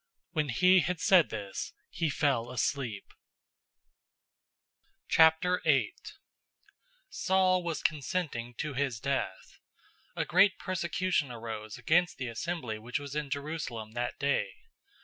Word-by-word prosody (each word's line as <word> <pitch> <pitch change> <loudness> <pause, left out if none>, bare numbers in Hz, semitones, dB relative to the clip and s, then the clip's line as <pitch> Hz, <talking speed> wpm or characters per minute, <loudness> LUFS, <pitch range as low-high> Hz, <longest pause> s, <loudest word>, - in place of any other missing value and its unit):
When 150 -4 -1
he 185 +9 +5
had 180 0 -1
said 180 -1 +5
this, 100 -3 -5 0.2
he 165 -2 -1
fell 135 -5 +1
asleep. 125 -4 -2 2.0
008:001 160 +3 +4 1.2
Saul 185 - +2
was 170 -2 -3
consenting 145 -6 -2
to 150 +4 -3
his 130 -4 -1
death. 135 +2 -3 0.6
A - - -1
great 190 +2 +4
persecution 175 -4 -1
arose 110 -2 -6
against 175 +2 +2
the 130 -2 -4
assembly 120 -3 -4
which 120 +3 -3
was 145 -1 -7
in 150 -2 -2
Jerusalem 140 -6 -4
in - - -19
that 120 +1 -3
day. 140 0 +1
145 Hz, 115 wpm, -30 LUFS, 120-175 Hz, 2.0 s, he